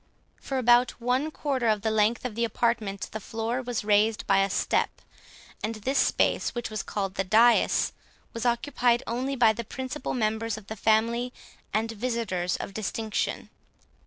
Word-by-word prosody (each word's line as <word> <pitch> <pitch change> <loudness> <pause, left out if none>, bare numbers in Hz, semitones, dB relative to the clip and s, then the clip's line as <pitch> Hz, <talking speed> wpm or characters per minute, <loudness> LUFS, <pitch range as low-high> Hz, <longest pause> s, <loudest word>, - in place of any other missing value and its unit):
For 270 - -3
about 245 0 +4
one 250 +5 0
quarter 275 -6 -1
of 215 -2 +1
the 220 - +1
length 220 +3 +2
of 250 - -3
the 235 +2 -1
apartment, 225 -3 -1
the 220 - -4
floor 225 +4 -3
was 245 -3 -3
raised 210 +1 +2
by 195 0 +4
a 195 0 +2
step, - - +1 0.7
and 220 +2 -2
this 260 +6 0
space, - - +1
which 240 -2 -4
was 215 - -2
called 195 -2 -3
the 195 - -1
dais, 225 +5 +4 0.4
was 230 - -4
occupied 240 0 +1
only 255 +4 -2
by 230 -4 +5
the 235 +2 -5
principal 260 +6 -5
members 220 -1 -1
of 215 - -11
the 220 - -6
family, 230 +3 +1 0.4
and 225 +1 0
visitors 225 -6 -2
of - - -6
distinction. 215 +1 -3
230 Hz, 165 wpm, -27 LUFS, 215-245 Hz, 0.7 s, by